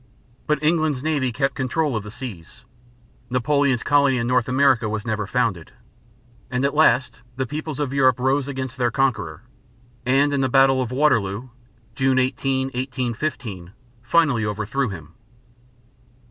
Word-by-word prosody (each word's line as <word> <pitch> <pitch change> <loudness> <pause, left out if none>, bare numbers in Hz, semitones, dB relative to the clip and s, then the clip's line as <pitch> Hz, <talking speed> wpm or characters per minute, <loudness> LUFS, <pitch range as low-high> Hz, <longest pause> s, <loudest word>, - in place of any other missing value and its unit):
But 150 -1 0
England's 155 -4 +1
navy 145 -5 0
kept 135 +3 -1
control 140 +1 -1
of 110 - -1
the 105 - -9
seas; 110 -2 -9 0.6
Napoleon's 130 0 +1
colony 140 -2 +3
in 115 - -1
North 125 0 +1
America 130 -4 +3
was 105 -1 -4
never 110 -3 -2
founded; 105 -9 -1 0.8
and 125 +2 0
at 140 - 0
last 130 -5 +3
the 130 0 -2
peoples 150 +2 -5
of 140 -2 -2
Europe 130 -3 +3
rose 135 +2 +1
against 130 -1 -5
their 120 -2 +1
conqueror, 115 - -1 0.6
and 140 +3 +2
in 140 - +1
the 130 - +1
battle 135 0 +4
of 125 -2 -3
Waterloo, 125 -5 +1 0.4
June 130 +2 +1
18, 130 +1 0
1815, 125 - -4 0.3
finally 135 -2 +2
overthrew 110 +5 -2
him. 80 -5 -9
130 Hz, 145 wpm, -22 LUFS, 115-140 Hz, 0.8 s, battle